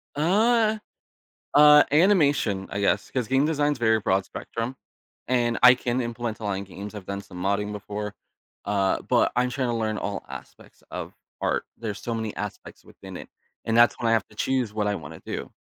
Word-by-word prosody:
Uh 215 Hz, +8 st, +3 dB, 0.8 s
uh, 150 Hz, 0 st, +8 dB
animation, 145 Hz, -, +3 dB
I 100 Hz, -, -3 dB
guess, 100 Hz, -, +1 dB
'cause 125 Hz, -3 st, -1 dB
game 135 Hz, +4 st, +2 dB
design's 145 Hz, -2 st, 0 dB
a -, -, -25 dB
very 110 Hz, -1 st, +3 dB
broad 95 Hz, -1 st, +1 dB
spectrum, 115 Hz, +3 st, -5 dB, 0.5 s
and 120 Hz, -2 st, +1 dB
I 125 Hz, 0 st, +9 dB
can 125 Hz, 0 st, -2 dB
implement 120 Hz, -2 st, -4 dB
a -, -, -7 dB
lot 100 Hz, -, -1 dB
in 95 Hz, +1 st, -3 dB
games, 100 Hz, +2 st, -9 dB
I've 100 Hz, -3 st, -8 dB
done 100 Hz, 0 st, -4 dB
some 90 Hz, -2 st, -9 dB
modding 100 Hz, +2 st, 0 dB
before, 105 Hz, 0 st, -5 dB, 0.5 s
uh, 100 Hz, -1 st, +1 dB
but -, -, +2 dB
I'm 125 Hz, +1 st, +2 dB
trying 130 Hz, 0 st, -1 dB
to 120 Hz, -, 0 dB
learn 110 Hz, -1 st, -1 dB
all 100 Hz, 0 st, -4 dB
aspects -, -, -12 dB
of -, -, -6 dB, 0.3 s
art. -, -, 0 dB
There's 110 Hz, -3 st, -4 dB
so 120 Hz, -, -3 dB
many 110 Hz, -2 st, -3 dB
aspects 105 Hz, -1 st, -7 dB
within -, -, -11 dB
it, -, -, -9 dB, 0.4 s
and 115 Hz, -, 0 dB
that's 120 Hz, 0 st, +6 dB
why 115 Hz, -, 0 dB
I -, -, +3 dB
have 110 Hz, -2 st, +2 dB
to -, -, -20 dB
choose 130 Hz, -5 st, 0 dB
what 105 Hz, -1 st, 0 dB
I 105 Hz, -, +1 dB
wanna 80 Hz, -7 st, -8 dB
do. -, -, -5 dB
115 Hz, 200 wpm, -25 LUFS, 105-130 Hz, 0.8 s, I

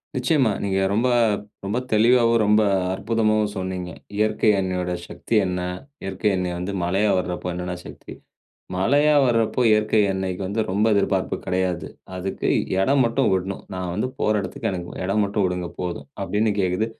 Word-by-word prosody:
நிச்சயமா. 130 Hz, -2 st, +2 dB
நீங்க 95 Hz, -1 st, 0 dB
ரொம்ப 115 Hz, +4 st, +2 dB, 0.6 s
ரொம்ப 100 Hz, +4 st, -1 dB, 0.2 s
தெளிவாவும், 115 Hz, +1 st, +4 dB
ரொம்ப 105 Hz, +1 st, +4 dB, 0.3 s
அற்புதமாவும் 110 Hz, 0 st, +1 dB
சொன்னீங்க. 95 Hz, -1 st, -4 dB, 0.3 s
இயற்கை 110 Hz, 0 st, +2 dB
அன்னையோட 90 Hz, -1 st, -2 dB, 0.2 s
சக்தி 115 Hz, -, -3 dB
என்ன? 90 Hz, 0 st, -2 dB, 0.4 s
இயற்கை 95 Hz, +2 st, -1 dB
அன்னை 90 Hz, -1 st, -1 dB
வந்து 90 Hz, +3 st, -3 dB
மழையா 95 Hz, +4 st, +1 dB
வர்றப்ப 90 Hz, 0 st, -3 dB
என்னென்ன 90 Hz, 0 st, -4 dB
சக்தி. -, -, -10 dB, 0.6 s
மழையா 145 Hz, +10 st, +3 dB
வர்றப்போ, 115 Hz, 0 st, +1 dB
இயற்கை 105 Hz, 0 st, +3 dB
அன்னைக்கு 95 Hz, -1 st, -3 dB
வந்து 105 Hz, +4 st, -1 dB
ரொம்ப 105 Hz, +3 st, +2 dB
எதிர்பார்ப்பு 100 Hz, -, +1 dB
கிடையாது. 90 Hz, -3 st, -1 dB, 0.3 s
அதுக்கு 95 Hz, +1 st, -3 dB, 0.3 s
இடம் 135 Hz, +8 st, +3 dB
மட்டும் 120 Hz, +3 st, +1 dB
விட்ணும். 95 Hz, +1 st, -3 dB
"நான் 90 Hz, -1 st, -3 dB
வந்து 105 Hz, +5 st, 0 dB
போற 105 Hz, -, +2 dB
இடத்துக்கு 95 Hz, -2 st, -4 dB
எனக்கு 90 Hz, -2 st, -5 dB, 0.2 s
இடம் 100 Hz, +3 st, +1 dB
மட்டும் 100 Hz, 0 st, 0 dB
விடுங்க 90 Hz, -1 st, -3 dB
போதும்." 90 Hz, -1 st, -4 dB
அப்பிடின்னு 105 Hz, +3 st, +1 dB
கேக்குது. 95 Hz, +4 st, +1 dB
100 Hz, 150 wpm, -23 LUFS, 90-110 Hz, 0.6 s, தெளிவாவும்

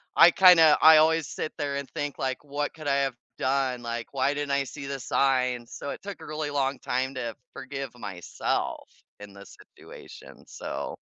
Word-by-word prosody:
I 170 Hz, +1 st, +8 dB
kinda 170 Hz, -5 st, +7 dB
I 160 Hz, 0 st, +9 dB
always 160 Hz, 0 st, +3 dB
sit 155 Hz, -, -5 dB
there 145 Hz, -2 st, -2 dB
and 140 Hz, -1 st, -4 dB
think 145 Hz, -1 st, -4 dB
like, 130 Hz, 0 st, -3 dB
"What 145 Hz, 0 st, -3 dB
could 155 Hz, -2 st, -9 dB
I 140 Hz, -, +2 dB
have 135 Hz, -3 st, -1 dB, 0.2 s
done?" 130 Hz, -2 st, -1 dB
Like, 115 Hz, 0 st, -4 dB
"Why 135 Hz, +1 st, +1 dB
didn't 145 Hz, -1 st, -3 dB
I 140 Hz, 0 st, +2 dB
see 140 Hz, +1 st, -8 dB
the 140 Hz, -1 st, -4 dB
signs?" 125 Hz, -2 st, 0 dB
So 140 Hz, -, -6 dB
it -, -, -8 dB
took 200 Hz, -1 st, -8 dB
a -, -, -11 dB
really 155 Hz, -1 st, -4 dB
long 140 Hz, -1 st, -1 dB
time 130 Hz, +2 st, -2 dB
to 120 Hz, -4 st, -5 dB, 0.2 s
forgive 135 Hz, -1 st, -6 dB
myself 100 Hz, -7 st, -4 dB, 0.3 s
in 105 Hz, -1 st, -11 dB
this 100 Hz, -1 st, -13 dB, 0.2 s
situation, -, -, -13 dB
so -, -, -6 dB
140 Hz, 190 wpm, -26 LUFS, 125-145 Hz, 0.3 s, I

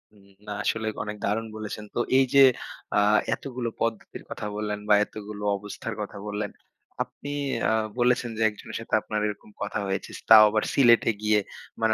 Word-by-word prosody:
উম 100 Hz, -1 st, -21 dB, 0.2 s
না। -, -, -5 dB
আসলে 110 Hz, +1 st, -1 dB, 0.2 s
অনেক 105 Hz, 0 st, -6 dB
দারুণ 110 Hz, +3 st, -1 dB
বলেছেন। 105 Hz, 0 st, -6 dB
তো -, -, 0 dB, 0.2 s
এই 135 Hz, -, +5 dB
যে, 140 Hz, -, +6 dB, 0.6 s
আ -, -, +6 dB, 0.3 s
এতগুলো 125 Hz, -3 st, -4 dB
পদ্ধতির 115 Hz, -1 st, -3 dB
কথা -, -, -6 dB
বললেন 105 Hz, -1 st, -3 dB
বা -, -, +7 dB
এতগুলো 105 Hz, -1 st, -8 dB
অবস্থার 105 Hz, +3 st, -6 dB
কথা 105 Hz, 0 st, -6 dB
বললেন, 105 Hz, 0 st, -3 dB, 0.5 s
আপনি 145 Hz, -, -11 dB, 0.4 s
আ -, -, +2 dB, 0.3 s
বলেছেন 120 Hz, 0 st, +2 dB
যে, -, -, -3 dB
একজনের 105 Hz, -, -8 dB
সাথে 115 Hz, -, -11 dB
আপনার 105 Hz, 0 st, -3 dB
এরকম 105 Hz, 0 st, -7 dB
কথা 105 Hz, 0 st, -2 dB
হয়েছে। 95 Hz, 0 st, -3 dB, 0.2 s
তাও 110 Hz, -1 st, +11 dB
আবার 110 Hz, +1 st, +1 dB
সিলেটে 120 Hz, -3 st, +5 dB
গিয়ে 105 Hz, 0 st, +3 dB, 0.4 s
মানে 110 Hz, -1 st, +3 dB
105 Hz, 170 wpm, -26 LUFS, 105-115 Hz, 0.6 s, তাও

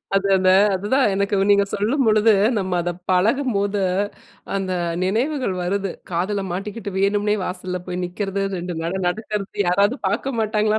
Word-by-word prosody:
அது 195 Hz, 0 st, +2 dB
அந்த 185 Hz, 0 st, +3 dB, 0.2 s
அதுதான் 210 Hz, +6 st, +2 dB
எனக்கு 200 Hz, +1 st, 0 dB, 0.2 s
நீங்க 200 Hz, 0 st, +5 dB
சொல்லும்பொழுது 220 Hz, 0 st, +3 dB, 0.3 s
நம்ம 190 Hz, -2 st, -3 dB
அத 175 Hz, -, -1 dB, 0.2 s
பழகும்போது, 205 Hz, 0 st, +1 dB, 0.7 s
அந்த 190 Hz, -1 st, -1 dB, 0.3 s
நினைவுகள் 240 Hz, +4 st, 0 dB
வருது. 195 Hz, +2 st, -1 dB, 0.2 s
காதுல 190 Hz, +4 st, -1 dB
மாட்டிக்கிட்டு 200 Hz, +2 st, -5 dB
வேணும்னே 205 Hz, +1 st, +2 dB
வாசல்ல 180 Hz, 0 st, -4 dB
போய் 180 Hz, 0 st, -3 dB
நிக்கிறது. 195 Hz, +2 st, -3 dB
2 175 Hz, 0 st, -4 dB
நட 170 Hz, +2 st, -2 dB, 0.2 s
நடக்கறது, 210 Hz, +1 st, -3 dB, 0.2 s
யாராவது 200 Hz, +7 st, +3 dB
பார்க்க 230 Hz, +5 st, -2 dB
மாட்டாங்களா? 215 Hz, 0 st, +1 dB
200 Hz, 135 wpm, -21 LUFS, 185-215 Hz, 0.7 s, நீங்க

